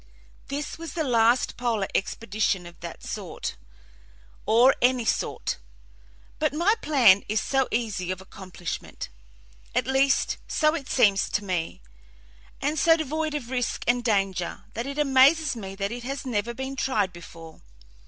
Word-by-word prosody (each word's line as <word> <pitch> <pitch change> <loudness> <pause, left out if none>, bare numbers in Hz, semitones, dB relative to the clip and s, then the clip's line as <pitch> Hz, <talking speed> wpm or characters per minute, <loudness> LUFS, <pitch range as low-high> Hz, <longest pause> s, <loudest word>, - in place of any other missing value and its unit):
This 285 +3 -4
was 330 -1 -7
the 325 - -1
last 240 -2 +3
polar 230 -5 0
expedition 200 -3 -1
of 175 0 -12
that 170 -1 -8
sort, - - -5 0.9
or 240 +5 +6
any 245 -1 +3
sort; - - -1 0.8
but 300 -2 0
my 350 +7 +4
plan 235 -10 +5
is 215 +1 +2
so 270 -1 +1
easy 215 -6 -2
of 185 0 -2
accomplishment 185 -2 -7 0.7
at - - +2
least, 265 +1 +2
so 305 -1 +2
it 290 -5 -5
seems 200 -6 +3
to 205 - -1
me 170 - -3 0.8
and 295 +2 -1
so 325 +3 +5
devoid 315 0 -2
of 255 -4 -5
risk 250 -2 -1
and 245 0 +2
danger, 195 -6 0
that 235 +3 -4
it 280 +1 -5
amazes 280 +1 +4
me 195 -4 -7
that 200 +1 -2
it 240 +1 -5
has 270 +3 -5
never 235 -1 -2
been 265 +2 -4
tried 215 -9 0
before. 165 -1 -12
240 Hz, 150 wpm, -26 LUFS, 195-275 Hz, 0.9 s, or